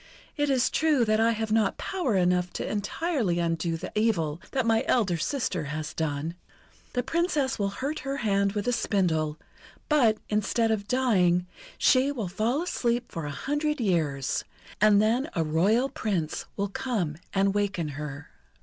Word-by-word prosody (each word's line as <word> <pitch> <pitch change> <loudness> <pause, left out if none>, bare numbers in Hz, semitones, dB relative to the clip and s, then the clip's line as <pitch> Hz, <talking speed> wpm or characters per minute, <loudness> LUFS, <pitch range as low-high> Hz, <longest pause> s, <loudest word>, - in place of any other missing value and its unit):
It 290 -1 0
is 260 -2 +2
true 300 -6 +3
that 215 0 +2
I 230 +1 +4
have 220 -1 -3
not 220 -2 +2
power 345 - -1
enough 180 -1 +2
to - - -3
entirely 210 - -1
undo 165 -1 0
the 180 - -7
evil 175 -8 0
that 260 -3 0
my 225 +1 +3
elder 210 -8 +2
sister 180 - -2
has 150 +1 -4
done. 160 0 -2 0.6
The 245 - 0
Princess 295 -3 0
will 200 -1 +1
hurt 275 +9 -3
her 275 +1 -3
hand 200 -4 +1
with 205 0 -2
a - - +3
spindle, 160 -9 0 0.5
but, 240 -8 +4
instead 220 +2 +1
of 205 -2 -1
dying, 190 -8 +2 0.3
she 265 +2 +4
will 225 -10 -3
fall 230 - 0
asleep 240 -8 -1
for 165 -3 -4
a - - -3
hundred 295 - -1
years, 155 - 0 0.4
and 210 -1 +6
then 235 +8 +2
a 165 - +2
royal 195 - +2
Prince 185 - -2
will 200 0 -1
come 195 - -2
and 195 0 +2
waken 200 -6 -1
her." 145 0 -7
210 Hz, 165 wpm, -27 LUFS, 170-250 Hz, 0.6 s, and